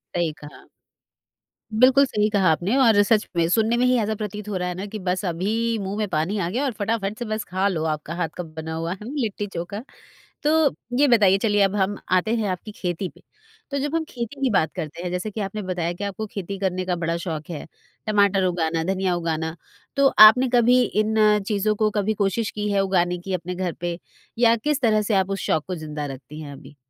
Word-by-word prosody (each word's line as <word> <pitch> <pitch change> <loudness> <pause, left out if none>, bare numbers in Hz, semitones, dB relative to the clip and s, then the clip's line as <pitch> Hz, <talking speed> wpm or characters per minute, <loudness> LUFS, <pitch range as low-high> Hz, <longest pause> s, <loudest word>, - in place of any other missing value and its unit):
सही 170 -2 +1
कहा। 150 - -12 1.1
बिल्कुल 265 +4 +6
सही 210 -5 0
कहा 200 -4 +3
आपने 175 +9 0
और 225 -5 +6
सच 215 +1 +2
में, 170 -1 +2
सुनने 225 +4 +2
में 250 - +3
ही 250 0 +4
ऐसा 220 0 0
प्रतीत 210 0 -6
हो 205 - -3
रहा 180 0 -2
है 180 - -3
ना 190 +3 -5
कि 210 +1 -7
बस 185 +1 -2
अभी, 215 +7 -1
मुँह 195 +1 -4
में 215 -1 -1
पानी 165 +7 -1
आ 170 -3 -1
गया 245 +9 -1
और 270 - 0
फटाफट 210 -1 -1
से 240 - -3
बस 215 -1 -3
खा 190 +2 +1
लो 170 -5 -1
आपका 155 0 -3
हाथ 170 -2 -1
का 180 - -3
बना 160 0 -7
हुआ 165 +2 -3
लिट्टी 225 -5 -3
चोखा। 195 +4 -6 0.6
तो 300 - +2 0.5
ये 290 +1 +5
बताइए 205 -6 +5
चलिए 205 -1 +2
अब 195 0 +2
हम 200 +1 0 0.2
आते 185 +5 +2
हैं 215 -3 -1
आपकी 185 +4 -5
खेती 180 +1 -3
पे, - - -19 0.5
तो 280 - -1
जब 290 +3 -2
हम 325 - -1
खेती 240 +3 -6
की 265 - +2
बात 190 -6 +2
करते 165 -1 -5
हैं 180 - -3
जैसे 180 +4 -3
की 215 - -6
आपने 205 +1 -4
बताया 180 -3 -2
की 175 +4 -6
आपको 200 +2 -4
खेती 200 -1 -6
करने 185 -1 -1
का 180 -1 0
बड़ा 165 0 -1
शौख 165 -2 -5
है, 155 -4 -6 0.4
टमाटर 200 -2 +3
उगाना, 165 -2 0
धनिया 190 -1 0
उगाना 160 -1 -2 0.4
तो 275 0 +4 0.2
आपने 255 +4 +2
कभी 245 +1 +5
इन 215 0 0 0.3
चीज़ों 215 0 +1
को 215 0 +2
कभी 210 +1 0
कोशिश 205 +2 0
की 210 0 -3
है 200 - +2
उगाने 180 -2 +1
की 185 +2 -5
अपने 180 +1 -4
घर 180 -1 -2
पे, 175 -1 -3 0.4
या 230 -1 +5
किस 290 +5 -1
तरह 215 -3 +3
से 210 +1 0
आप 190 0 +2
उस 195 - -2
शौक 155 - +1
को 185 - -3
ज़िंदा 150 -3 -5
रखती 145 +3 -9
हैं 145 -2 -8
अभी? 140 +1 -13
195 Hz, 225 wpm, -23 LUFS, 175-215 Hz, 1.1 s, बिल्कुल